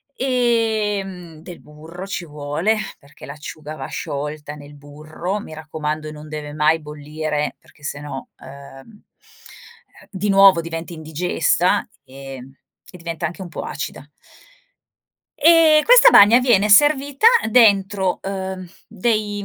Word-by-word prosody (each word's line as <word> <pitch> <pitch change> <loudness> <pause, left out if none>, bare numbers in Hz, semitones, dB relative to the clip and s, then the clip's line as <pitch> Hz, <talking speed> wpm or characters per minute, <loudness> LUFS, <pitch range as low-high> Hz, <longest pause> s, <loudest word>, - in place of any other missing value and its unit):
ehm, 215 -9 -1
del 175 +1 -11
burro 160 +5 -11
ci 190 -3 -5
vuole, 150 +7 -2 0.2
perché 140 -1 -15
l'acciuga 150 +1 -9
va 135 -3 -7
sciolta 150 0 -6
nel 145 0 -13
burro, 155 +7 -6
mi 180 - -10
raccomando 155 0 -5
non 150 0 -11
deve 150 -1 -7
mai 155 +2 +1
bollire 150 0 -4
perché 145 - -25
se 145 0 -5
no, 145 -2 -8
ehm, 140 +8 -14 1.1
di 200 +1 -3
nuovo 195 -3 +6
diventi 165 +1 -7
indigesta 165 +4 0 0.2
e 135 0 -10 0.5
e - - -10
diventa 170 -1 -5
anche 170 +4 -10
un - - -9
po' - - -7
acida. 145 - -6 1.3
E 315 0 +5
questa - - +7
bagna 220 - +7
viene 225 -5 +3
servita 285 - +4 0.2
dentro, 200 -5 +3
ehm, 190 -1 -5 0.2
dei 210 -1 -2
170 Hz, 125 wpm, -20 LUFS, 150-205 Hz, 1.3 s, questa